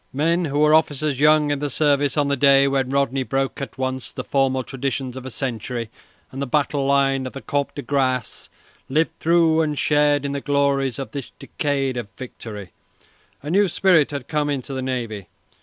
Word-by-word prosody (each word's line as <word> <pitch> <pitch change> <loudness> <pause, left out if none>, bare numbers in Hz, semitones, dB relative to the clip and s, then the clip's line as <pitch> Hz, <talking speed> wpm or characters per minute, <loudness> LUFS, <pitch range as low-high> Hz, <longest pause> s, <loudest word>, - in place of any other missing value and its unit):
Men 165 +5 +1
who 145 -1 -2
were 150 +1 +4
officers 150 -3 +2
young 150 0 +4
in 145 - -1
the 145 0 -2
service 145 0 +1
on 145 -1 +2
the 140 - +1
day 140 0 +5
when 135 -2 0
Rodney 135 -1 +1
broke 135 +1 -2
at 140 - -6
once 130 -1 -3
the 130 - -6
formal 130 -1 +1
traditions 135 -1 -4
of 130 0 -7
a - - -4
century 120 -2 -4 0.4
and 135 - -6
the 140 - -2
battle 140 0 0
line 135 -1 +2
of - - -9
the 135 - -7
Comte 140 -1 -2
de 145 - -5
Grasse 130 -2 -1 0.4
lived 155 +4 +1
through 165 -1 +3
and 150 -2 -1
shared 145 -1 +2
in 140 - -2
the 140 0 -3
glories 140 -3 +1
of 135 -5 -6
this 140 -1 -6
decade 135 -3 -2
of 120 - -4
victory. 110 -6 -8 0.7
A 150 - -4
new 200 +2 +4
spirit 175 -3 +3
had 140 -4 -6
come 150 -2 0
into 135 -1 -3
the 130 - -3
navy. 115 -7 -4
140 Hz, 195 wpm, -22 LUFS, 130-145 Hz, 0.7 s, day